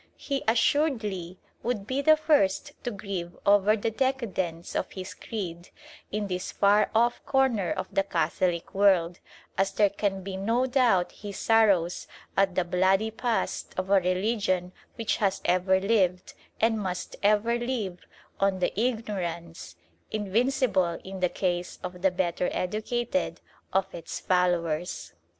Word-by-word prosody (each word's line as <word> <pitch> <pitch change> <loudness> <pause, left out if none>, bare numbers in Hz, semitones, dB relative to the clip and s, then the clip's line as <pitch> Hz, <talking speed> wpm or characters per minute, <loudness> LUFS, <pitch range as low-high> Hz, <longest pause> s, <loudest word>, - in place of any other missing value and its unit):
He, 275 -1 -2
assuredly, 225 - +1 0.2
would 230 -4 -2
be 260 +5 -1
the 310 +2 +6
first 290 -12 +2
to - - -1
grieve 195 -5 -5
over 205 +1 +5
the 225 +2 -1
decadence 210 -10 -2
of - - -2
his 185 -1 -6
creed 175 -6 -6 0.4
in 210 0 -1
this 180 -2 -3
far 205 +1 +3
off 235 +2 +2
corner 260 -8 +2
of - - -2
the - - +3
Catholic 170 -1 -1
world, 190 -3 +3 0.4
as 195 0 +2
there 205 -2 +3
can 200 -2 -2
be 190 0 -5
no 230 +6 +1
doubt 245 -9 +2
he 205 -1 -8
sorrows 200 -5 +2 0.3
at 195 -2 +2
the 185 - +2
bloody 190 +5 +2
past 230 +1 -2
of 185 +1 -2
a 200 - +7
religion 185 0 0 0.2
which 230 -2 -1
has 195 -2 +1
ever 185 +1 +3
lived, 190 -3 +1 0.3
and 225 0 +2
must 180 -2 -4
ever 215 +3 +3
live, 230 -8 -3 0.4
on 195 -1 +2
the 180 - 0
ignorance 185 -8 -3 0.3
invincible 210 -4 +1
in 190 0 -7
the 180 -1 +2
case 175 -1 -2
of 180 0 -6
the 190 - +4
better 180 -1 -1
educated 235 +7 -2 0.3
of 190 0 0
its 165 -1 -6
followers. 175 - 0
195 Hz, 140 wpm, -27 LUFS, 180-225 Hz, 0.4 s, a